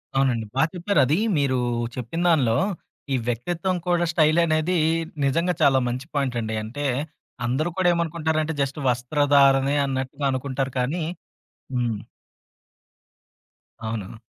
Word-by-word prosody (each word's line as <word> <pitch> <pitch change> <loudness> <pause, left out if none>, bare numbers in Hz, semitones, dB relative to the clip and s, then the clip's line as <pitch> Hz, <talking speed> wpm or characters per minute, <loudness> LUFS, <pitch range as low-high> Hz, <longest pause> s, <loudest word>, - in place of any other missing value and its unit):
అవునండి. 130 -4 +2
బా 135 - +4
చెప్పారు, 180 +3 0
అది 150 +5 +2 0.2
మీరు 135 -3 +1 0.4
చెప్పిన 130 +8 -4
దానిలో 130 -9 +3 0.6
ఈ - - +3
వ్యక్తిత్వం 170 - -1
కూడా 175 -1 +2
స్టైలనేది 160 +1 +3 0.5
నిజంగా 170 +6 +1
చాలా 135 -1 +5
మంచి 125 +3 -3
పాయింట్ 135 -4 0
అండి. 110 0 -3
అంటే 145 +7 -5 0.6
అందరూ 135 +8 0
కూడా 185 -1 +2
ఏమనుకుంటారంటే 160 -1 -1
జస్ట్ 140 +2 -2
వస్త్రధారణే 140 +2 +3
అన్నట్టుగా 135 +1 -3
అనుకుంటారు 135 0 -2
కానీ 150 +7 -1 0.7
హ్మ్. 120 -3 0 1.9
అవును. 110 -1 -5
140 Hz, 115 wpm, -24 LUFS, 125-160 Hz, 1.9 s, చాలా